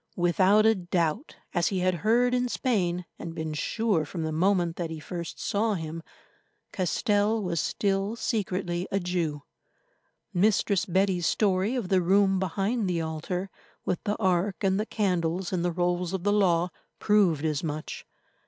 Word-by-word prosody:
Without 185 +4 +4
a 225 - +6
doubt, 175 - -2 0.2
as 175 -2 +2
he 190 -2 -1
had 185 0 +2
heard 240 +4 +3
in 250 0 +1
Spain, 180 -10 0
and 165 -1 -6
been 160 -1 -3
sure 205 +2 0
from 165 +1 -5
the 160 - -2
moment 175 0 +1
that 170 -2 -3
he 160 -1 -6
first 170 +1 -6
saw 210 +1 0
him, 160 -1 -5 0.7
Castell 205 +3 +1
was 170 -3 -1
still 195 +5 0
secretly 185 -6 -2
a 195 - +1
Jew. 170 -5 -2 0.9
Mistress 200 0 +2
Betty's 185 -1 +1
story 200 +3 +1
of 230 -8 -3
the 190 -2 +3
room 195 +1 +3
behind 195 +4 -1
the 175 -2 0
altar, 165 +4 -3 0.3
with 180 - -2
the 205 -1 0
ark 190 -1 +1
and 190 0 +2
the 215 - -2
candles 180 -3 -1
and 175 -2 0
the 175 - +1
rolls 175 +1 -1
of 190 -2 -3
the 205 +1 +2
Law, 180 -4 +3 0.3
proved 185 -8 +3
as 155 -1 -1
much. 155 -1 -5
185 Hz, 160 wpm, -27 LUFS, 170-205 Hz, 0.9 s, a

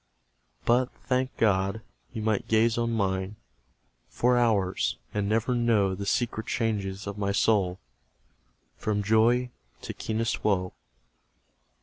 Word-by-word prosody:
But, 125 +2 +3 0.2
thank 130 0 -1
God! 100 0 +1 0.3
you 110 -4 -5
might 110 -2 0
gaze 115 +1 +3
on 115 0 0
mine 95 -2 -1 0.7
For 125 +1 +2
hours, 105 -6 +1 0.2
and 105 -1 -1
never 115 +3 +1
know 115 -5 +2
The 100 +2 -5
secret 115 -1 -1
changes 100 -4 -2
of 100 0 -6
my 100 -1 0
soul 100 -3 +2 1.0
From 105 -1 -1
joy 115 +4 +3 0.3
to - - -5
keenest 110 +1 -2
woe. 90 -3 +1
110 Hz, 120 wpm, -27 LUFS, 100-115 Hz, 1.0 s, But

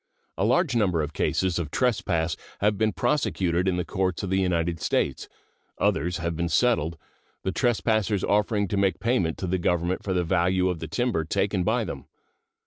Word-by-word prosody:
A - - -1
large 135 - +2
number 90 -8 +2
of 75 +1 -5
cases 90 +2 0
of 80 -4 -3
trespass 85 - 0 0.2
have 105 +1 +2
been 110 +1 +1
prosecuted 95 - 0
in 90 -1 +1
the 90 - -1
courts 95 -1 -1
of 95 - -3
the 95 - +2
United 85 -2 0
States; 65 - -1 0.5
others 90 +4 +1
have 85 0 -3
been 85 +1 -1
settled, 85 -6 +2 0.5
the 95 - -1
trespassers 110 -3 +1
offering 105 0 +1
to 100 - -1
make 100 -1 +1
payment 115 -9 0
to - - -4
the 90 +1 0
Government 85 +1 0
for 95 - -2
the 90 -1 +1
value 90 +1 +2
of 90 -3 -2
the 80 - -5
timber 115 -2 0
taken 95 +4 0
by 110 +5 +1
them. 70 -9 -7
95 Hz, 185 wpm, -26 LUFS, 85-105 Hz, 0.5 s, large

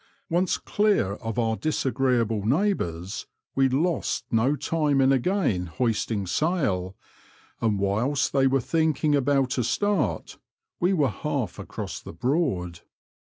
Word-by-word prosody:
Once 175 +2 +2
clear 205 - +1
of 115 +1 -5
our 115 -2 +1
disagreeable 125 -6 0
neighbours, 110 - -1 0.3
we 135 -1 +3
lost 160 +7 0
no 120 +6 +2
time 150 -2 0
in 135 0 +4
again 130 - +1
hoisting 110 +1 -1
sail, 100 - 0 0.7
and 110 -3 +1
whilst 110 +9 0
they 135 -1 +4
were 135 +1 +2
thinking 155 +1 +1
about 135 -1 +1
a - - +2
start, 205 - -1 0.4
we 180 +2 +2
were 150 -8 +2
half 95 - -3
across - - -6
the - - -10
Broad. 90 - -1
130 Hz, 125 wpm, -25 LUFS, 110-155 Hz, 0.7 s, in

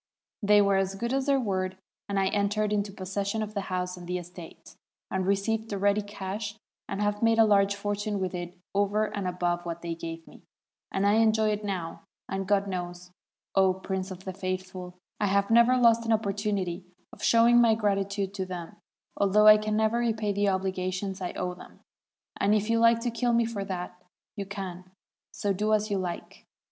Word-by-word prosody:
They 205 0 +5
were 200 -1 +3
as 195 0 0
good 235 +5 -2
as 270 0 0
their 275 -1 +4
word, 190 -5 -2 0.3
and 200 -1 0
I 190 0 +2
entered 210 +1 0
into 205 -1 -1
possession 200 +3 -3
of 215 0 -7
the 200 - -2
house 180 0 -2
and 175 -1 -10
the 180 0 -1
estate, 175 -1 -11 0.4
and 190 -1 -1
re 200 - +4
ceived 220 +3 -2
the 200 - -2
ready 200 +2 +2
cash, 205 +1 -5 0.3
and - - -3
have 205 0 -1
made 225 0 +4
a 225 - +7
large 200 -1 +3
fortune 205 0 -2
with 185 -1 -2
it 175 0 -6 0.2
over 205 +2 +2
and 200 -2 -2
above 175 -1 -1
what 170 0 -6
they 170 -1 -2
gave 165 0 -7
me, - - -16 0.5
and 195 +1 0
I 205 +2 +4
enjoy 220 -1 +3
it 210 0 -2
now; 185 -5 -4 0.3
and, 195 0 -3
God 200 0 +2
knows, 180 -1 -5 0.4
0 190 -1 +5
Prince 190 0 -4
of 185 -1 -9
the 190 - -4
Faithful, 185 -1 -5 0.2
I 210 - +1
have 200 +2 +1
never 235 +2 +6
lost 230 -1 +5
an 225 - +3
opportunity 200 -4 -1 0.3
of - - -13
showing 235 +1 +5
my 225 -2 +5
gratitude 200 -2 -1
to 190 -2 -3
them, 175 -2 -7 0.4
although 205 +1 +4
I 215 0 +10
can 215 0 -1
never 220 +2 +2
repay 220 -3 0
the 200 0 +2
obligations 190 0 -2
I 180 - -3
owe 180 0 -3
them; 180 - -14 0.6
and 205 +2 +3
if 215 +2 0
you 230 - +3
like 230 0 +5
to 240 0 -1
kill 240 +1 0
me 235 0 +3
for 220 -3 -3
that, 180 -1 -6 0.3
you 200 -3 -5
can; 190 -3 -6 0.5
so 200 -1 -1
do 210 +3 0
as 215 0 -2
you 200 - +1
like! 180 -2 -6
200 Hz, 200 wpm, -28 LUFS, 185-215 Hz, 0.6 s, I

